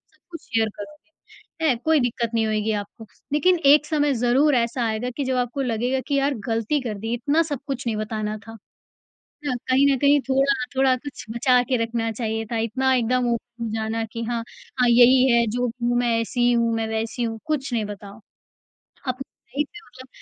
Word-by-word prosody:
सब - - -36
कुछ 335 - -8
शेयर 225 -1 0
करोगे 300 +9 -11 0.6
है 260 - +3
कोई 315 -1 +4
दिक्कत 235 -2 -1
नहीं 225 -1 +2
होगी 215 0 0
आपको। 205 +2 -13 0.3
लेकिन 355 +4 +3
एक 295 +2 +7
समय 295 -2 +1
ज़रूर 255 +5 +3
ऐसा 235 +1 0
आएगा 220 +2 -2
कि 285 - 0
जब 260 0 0
आपको 250 +3 -1
लगेगा 250 +1 0
कि 285 - 0
यार 280 +1 +1
गलती 230 +5 0
कर 225 -5 -4
दी 225 - -1
इतना 285 +7 +1
सब 285 - -2
कुछ 270 -3 -4
नहीं 225 - 0
बताना 215 0 -3
था। 225 0 -9 0.9
न 270 - 0
कहीं 265 +2 +4
न - - +2
कहीं 285 +2 +4
थोड़ा 270 -1 +2
थोड़ा 265 -1 +4
कुछ 285 +2 -9
बचा 245 +2 +3
के 255 +1 0
रखना 230 0 -1
चाहिए 225 0 -3
था - - 0
इतना 260 +4 +1
एकदम 250 0 +1
ओपन 235 0 -6
हो - - -2
जाना 225 +1 -2
कि 230 - -4
हाँ, 235 0 -2 0.4
हाँ 245 - +4
यही 250 +2 +6
है 235 0 +4
जो 245 +2 0
भी 240 +1 -4
हूँ 240 - +2
मैं 245 -1 +1
ऐसी 240 +1 +1
हूँ 230 -1 +2
मैं 225 0 -1
वैसी 220 +2 -3
हूँ, 225 -1 -3
कुछ 285 -4 -2
नहीं 225 -3 0
बताओ। 205 0 -9 0.9
अपनी 255 +1 -4 0.3
लाइफ 295 0 +1
मैं 345 - -12
मतलब 255 +1 -14
245 Hz, 205 wpm, -23 LUFS, 225-270 Hz, 0.9 s, एक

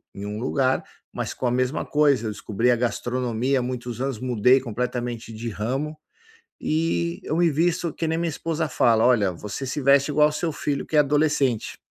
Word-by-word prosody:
em 100 - -6
um 105 +1 -4
lugar, 130 +1 +1 0.3
mas - - -3
com - - -5
a 120 - +2
mesma 130 +3 0
coisa. 145 -5 +2
Eu - - -2
descobri 115 +3 0
a - - +4
gastronomia 125 +1 -1
há - - -1
muitos 125 -1 -4
anos, 135 -3 -2
mudei 125 +1 +3
completamente 120 -1 -4
de 115 +2 -6
ramo 130 +9 -3 0.7
e 85 - 0
eu 155 - -1
me 170 -1 +4
visto 170 +2 0
que 165 - -3
nem 160 +1 0
minha 170 0 0
esposa 160 0 -2
fala: 115 -3 +3
"Olha, 105 -7 +3
você 105 +9 -6
se 135 +3 -3
veste 140 +2 +4
igual 150 +1 +5
ao - - -2
seu 160 +2 -2
filho 145 -1 -2
que - - -4
é 150 - +7
adolescente", 145 -5 +1
130 Hz, 195 wpm, -24 LUFS, 115-150 Hz, 0.7 s, é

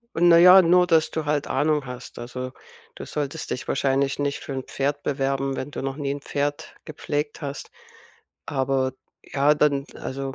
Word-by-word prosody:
Und 175 +1 +4
na 170 - +8
ja, 180 +2 +9
nur 180 +1 +4
dass 160 -2 +3
du 160 -1 -3
halt 145 -1 0
Ahnung 150 0 +1
hast. 125 0 -9
Also, 125 +1 -6 0.4
du - - -8
solltest 150 +1 -4
dich 125 - -4
wahrscheinlich 135 0 +1
nicht 145 0 -1
für 140 - -7
'n 130 -1 -4
Pferd 145 +2 -2
bewerben, 135 -1 -1
wenn 130 - -5
du - - -5
noch 135 +1 -3
nie 140 -2 -2
'n 140 - -5
Pferd 145 +3 -3
gepflegt 150 -1 -4
hast. 140 -1 -6 0.8
Aber, 130 -1 0 0.3
ja, 145 +2 +2
dann, 145 -2 +2
also, 135 0 -5
140 Hz, 180 wpm, -24 LUFS, 135-150 Hz, 0.8 s, ja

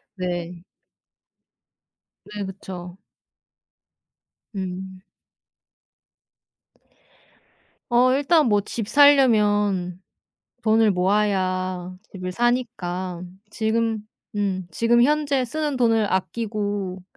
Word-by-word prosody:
네. 175 -2 -4 1.6
네. 205 -1 -6
그쵸. 185 -2 -8 1.6
음. 190 0 -6 2.9
어 250 +2 +4
일단 295 +3 +3
뭐 205 -3 +3
집 210 +1 -5
사려면 210 -10 +4 0.6
돈을 220 -1 +4
모아야 185 -2 0 0.2
집을 185 -2 -6
사니까 190 -7 -2 0.3
지금 225 0 0 0.4
음 190 -3 -2
지금 230 +7 +2
현재 285 -1 +2
쓰는 295 +2 -2
돈을 225 -4 +2
아끼고 205 -2 -2
205 Hz, 130 characters per minute, -23 LUFS, 185-235 Hz, 2.9 s, 어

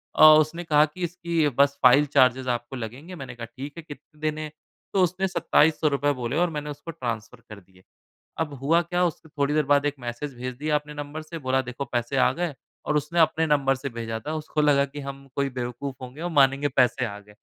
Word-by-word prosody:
और 155 0 +9
उसने 165 +3 -3
कहा 150 -3 +4
कि, 155 +4 -8
"इसकी 170 -3 0
बस 140 0 +4
फ़ाइल 135 +4 +7
चार्जेज़ 130 -1 +4
आपको 120 +2 -3
लगेंगे।" 130 +9 -7
मैंने 135 -6 -8
कहा, 120 -1 -6
"ठीक 135 +5 -9
है। 170 - -7
कितने 150 0 -13
देने 155 0 -1
हैं?" 155 - -7 0.4
तो 190 - +4
उसने, 185 +2 0
₹2700 150 -5 +2
बोले 120 +2 -2
और 175 +1 +2
मैंने 150 -2 -5
उसको 145 +3 -7
ट्रांसफ़र 120 -5 -5
कर 105 -2 -9
दिए। 95 0 -23 0.6
अब 155 -3 -2
हुआ 165 +5 +4
क्या, 175 +2 0
उसके 165 -2 -3
थोड़ी 145 -1 -1
देर 155 0 +2
बाद 145 0 +3
एक 145 - 0
मैसेज 125 +4 -5
भेज 125 +1 -5
दिया 150 +3 -1
अपने 150 0 -2
नंबर 145 +1 -6
से, 165 +2 -8
बोला 130 -2 +1
देखो 125 +2 -5
पैसे 120 +1 -2
आ 130 - +4
गए 170 +1 -3 0.3
और - - +1
उसने 150 +4 0
अपने 160 0 +3
नंबर 140 -3 +2
से 135 +2 -5
भेजा 115 -1 -4
था, 150 - -5
उसको 155 0 -3
लगा 145 -2 +4
कि 140 +1 -8
हम 140 0 -8
कोई 140 -1 0
बेवकूफ़ 125 +2 -4
होंगे 130 +4 -9
और 175 - -2
मानेंगे 140 -1 +3
पैसे 130 -2 +2
आ 100 -2 -7
गए। 105 0 -19
145 Hz, 225 wpm, -25 LUFS, 130-155 Hz, 0.6 s, और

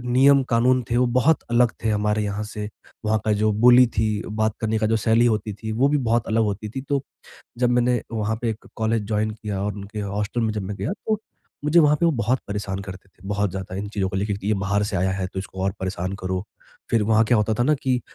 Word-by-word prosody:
नियम-कानून 130 -1 +4
थे, 120 - +1
वो 125 0 +3
बहुत 130 +6 +3
अलग 120 -1 +3
थे 110 - +2
हमारे 105 0 +1
यहाँ 100 +1 -3
से, 105 0 -6 0.4
वहाँ 110 0 +2
का 110 - +2
जो 110 - +3
बोली 125 +3 +6
थी, 110 -1 -1
बात 110 0 -1
करने 110 0 0
का 110 - +1
जो 115 +1 +2
शैली 115 +2 +3
होती 110 -2 0
थी, 110 +1 -5
वो 125 +6 +3
भी 150 0 +2
बहुत 120 -2 +1
अलग 110 +1 +2
होती 105 +1 -3
थी। 135 - -5
तो, 140 -1 +1 0.6
जब 125 -1 +2
मैंने 125 0 +2
वहाँ 110 0 -1
पे 120 - 0
एक 110 0 -6
कॉलेज 110 -1 0
जॉइन 110 0 0
किया 105 -2 -5
और 105 -1 -1
उनके 105 +1 -7
हॉस्टल 105 +3 -2
में 110 -1 0
जब 105 - -3
मैं 100 +2 -5
गया - - -2
तो 215 -1 +1 0.5
मुझे 165 +3 +5
वहाँ 150 -1 +5
पे 170 - +2
वो 165 - +4
बहुत 125 0 0
परेशान 100 -1 -3
करते 95 0 -10
थे, 95 +1 -15
बहुत 105 -1 0
ज़्यादा, 95 -1 -6
इन 100 +2 -4
चीज़ों 100 -3 -1
को 95 - -5
लेके 100 +1 -1
कि 100 - -6
ये 110 - +3
बाहर 100 +2 0
से 100 -1 -2
आया 95 +2 +1
है 95 -1 -2
तो 95 - -5
इसको 95 0 -7
और 95 - +1
परेशान 95 0 -3
करो। 95 0 -2 0.5
फिर 115 -2 +2
वहाँ 110 +1 +4
क्या 120 0 +3
होता 105 +1 +1
था - - +4
ना 150 +4 +3
कि 125 -2 +1
110 Hz, 250 wpm, -23 LUFS, 100-120 Hz, 0.6 s, बोली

